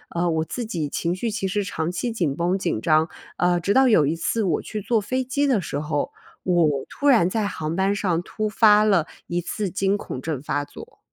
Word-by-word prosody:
呃， 170 0 +1
我 160 -1 0
自 245 - -4
己 160 -8 -2
情 170 +4 -2
绪 225 +4 -2
其 200 -2 -2
实 205 +2 -1
长 165 -4 -3
期 235 +6 -2
紧 165 -11 -1
绷、 175 +3 0
紧 170 - -1
张， 155 +4 +3 0.3
呃， 175 0 +2
直 195 +4 0
到 265 0 +5
有 165 -11 +5
一 155 - 0
次 215 +6 -1
我 180 - 0
去 215 -2 -6
坐 230 0 +1
飞 255 +5 -1
机 285 +3 0
的 255 -6 +3
时 145 -5 -4
候， 150 -1 -2 0.3
我 160 -7 +2
突 285 - -3
然 235 -11 +5
在 210 +2 -1
航 160 -4 -4
班 195 +2 +1
上 180 -5 0
突 215 +4 -3
发 210 0 +5
了 195 -7 +3 0.2
一 175 0 -2
次 200 +2 -3
惊 195 +2 +1
恐 130 - -6
症 155 -1 -3
发 145 0 -1
作 - - -13
185 Hz, 245 characters per minute, -23 LUFS, 160-215 Hz, 0.3 s, 到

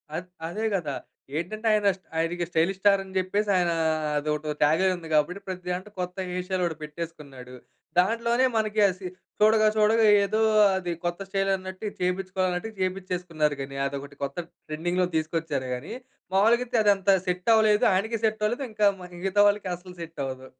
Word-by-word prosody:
అద్ 180 +2 -5 0.2
అదే 210 +6 -4
గదా! 150 -7 -2 0.4
ఏంటంటే 215 +7 -3
ఆయన 210 -1 +3
స్ట్ 185 - -34
ఆయనకి 170 +2 0
స్టైలిష్ 175 +3 +1
స్టార్ 200 0 +4
అని 190 - -13
జెప్పేసి 200 +3 0
ఆయనా 175 -2 +1 0.4
అదోటి 150 0 -2
టాగ్‌లైన్ 175 +6 +3
ఉంది. 170 -2 -9
కాబట్టి 165 +6 +1
ప్రతి 185 -1 -5
దాంట్లో 185 +4 -4
కొత్త 180 0 -3
హెయిర్ 180 0 -3
స్టైల్ 185 -1 -1
ఒకటి 165 -3 -3
పెట్టేసుకున్నాడు. 150 -5 -8 0.5
దాంట్లోనే 235 +6 +2
మనకి 215 0 0
అసి 185 0 -6 0.3
చూడగా 215 0 +5
చూడగా 220 +1 +4 0.2
ఏదో 215 +2 0 0.4
అది 180 -2 -2
కొత్త 175 +2 -2
స్టైలన్నట్టు 195 0 -2
ఇది - - -18
చేయిపిచ్చుకోవాలన్నట్టుగా, 185 +2 -1
చేయిపిచ్చేసుకున్నారు 180 -5 -1
గాని 135 0 -6
అదొకటి 140 +1 -7
కొత్త 140 +2 -4 0.3
ట్రెండింగ్‌లో 175 +4 0
తీసుకొచ్చారు 155 -4 -1
గాని 130 - -7 0.4
మావూలుగా 225 +5 +4
అయితే 240 -1 0
అదంతా 200 -1 +4
సెట్టవ్వలేదు. 210 +3 +3
ఆయనకీ 220 +4 0
సెట్టవ్వలేదు. 220 +4 0
ఇంకా 215 -1 +1 0.2
మరి 180 0 -11
మిగతా 195 +2 +2
వాళ్ళకి 205 -1 +1
అసలు 180 +1 -12
సెట్టవ్వదు. 135 -5 -5
185 Hz, 155 wpm, -26 LUFS, 165-205 Hz, 0.5 s, చూడగా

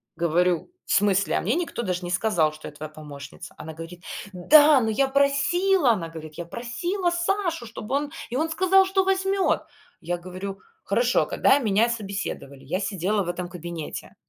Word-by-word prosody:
говорю: 170 - +1
"В - - -5
смысле? 200 -1 +3
А - - -1
мне 220 +9 0
никто 335 -7 -2
даже 180 -3 -2
не 175 - -4
сказал, 175 -5 +2
что 155 - -10
я - - -8
твоя 150 +1 -7
помощница". 145 -2 -10
Она 160 - -8
говорит: 165 +3 -10 0.3
"Да, 290 - +7
но 225 - 0
я 270 +5 +2
просила!- 280 +4 +3
она 175 -7 -2
говорит.- 155 -1 -9
Я 170 - -5
просила 345 - -2
Сашу, 345 -4 -1
чтобы 230 +2 -5
он 290 0 -1 0.2
и 240 - -5
он 315 +4 0
сказал, 380 +3 +4
что 385 0 +2
возьмет". 385 0 +1 0.4
Я 175 +1 -2
говорю: 185 +2 -7 0.3
"Хорошо, - - +2
когда 280 - +3
меня 220 -2 +3
собеседовали, 200 - -5
я 185 - -1
сидела 200 0 0
в 175 - -5
этом 175 0 -3
кабинете, 170 -3 -7
210 Hz, 175 wpm, -25 LUFS, -, 0.4 s, Да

